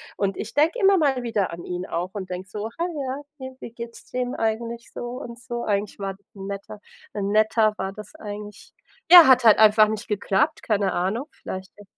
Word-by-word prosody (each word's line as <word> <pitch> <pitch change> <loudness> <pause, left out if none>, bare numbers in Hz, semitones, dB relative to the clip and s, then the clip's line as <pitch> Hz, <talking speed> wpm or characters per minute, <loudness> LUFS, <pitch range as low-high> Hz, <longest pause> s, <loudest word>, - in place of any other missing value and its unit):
Und 195 -1 -1
ich - - -6
denke 325 +11 +2
immer 390 -1 +5
mal 275 -5 +2
wieder 215 -6 -1
an 170 +1 -8
ihn 180 +1 -4
auch 180 +2 -3
und 190 -3 -6
denke 180 +1 -5
so: 215 +2 -5
„Ha, 340 - +1
ja, 280 -4 -4 0.2
ne, 260 0 -8
wie 230 - -8
geht's 235 0 -9
dem 250 0 -2
eigentlich 230 +1 -3
so“ - - -6 0.2
und 235 0 -8
so? 240 -1 -5
Eigentlich 205 0 -1
war 195 -1 -3 0.2
'n 195 -1 -8
Netter 200 +1 -7 0.3
'n 200 -1 -2
Netter 215 0 +3
war 190 0 -3
das 210 +9 -11
eigentlich. 210 -4 -9 0.4
Ja, 345 -4 +11
hat 255 -1 +6
halt 220 -1 +7
einfach 215 0 +6
nicht 220 +2 -4
geklappt, 200 -2 0
keine 205 -3 +1
Ahnung, 210 - -1
vielleicht 190 0 -7
ja 205 - -13
215 Hz, 205 wpm, -24 LUFS, 200-245 Hz, 0.4 s, Ja